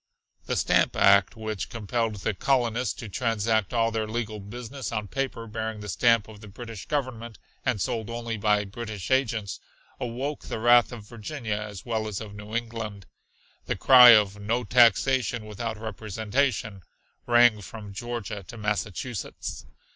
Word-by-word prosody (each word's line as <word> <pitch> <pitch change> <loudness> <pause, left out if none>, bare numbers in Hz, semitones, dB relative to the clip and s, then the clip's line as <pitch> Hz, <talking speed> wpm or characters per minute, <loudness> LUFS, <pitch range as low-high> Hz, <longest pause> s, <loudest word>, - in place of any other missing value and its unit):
The - - 0
"stamp - - +2
act," 100 +1 +5
which 110 -3 -4
compelled 115 0 -2
the 100 +2 -2
colonists 120 +1 0
to 115 - -8
transact 110 -1 0
all 115 -2 +2
their 110 -1 -2
legal 110 -1 -3
business 120 +4 -7
on 105 -1 -3
paper 130 -1 -3
bearing 110 -1 -4
the 105 - -7
stamp 115 +2 +3
of 105 -2 -13
the 105 - -11
British 115 0 -9
Government, 120 -6 -3 0.3
and 125 -5 0
sold 115 -1 -2
only 115 -1 -4
by 105 -1 +2
British 105 0 -6
agents, 115 -6 0 0.4
awoke 130 +5 -4
the - - -4
wrath 120 +2 +5
of 110 -4 -9
Virginia 115 +1 -5
as 105 -2 -6
well 110 -2 -1
as 105 -3 -4
of 105 -2 -8
New 105 +1 -8
England. 115 -4 -4 0.6
The - - 0
cry 125 -3 +9
of 105 -1 +2
"no 115 +4 0
taxation 120 0 +3
without 110 +1 -5
representation" 110 +1 -2 0.5
rang 120 -3 +5
from 105 0 -9
Georgia 110 -2 -5
to 120 - -9
Massachusetts. 105 +1 -4
110 Hz, 155 wpm, -26 LUFS, 105-120 Hz, 0.6 s, cry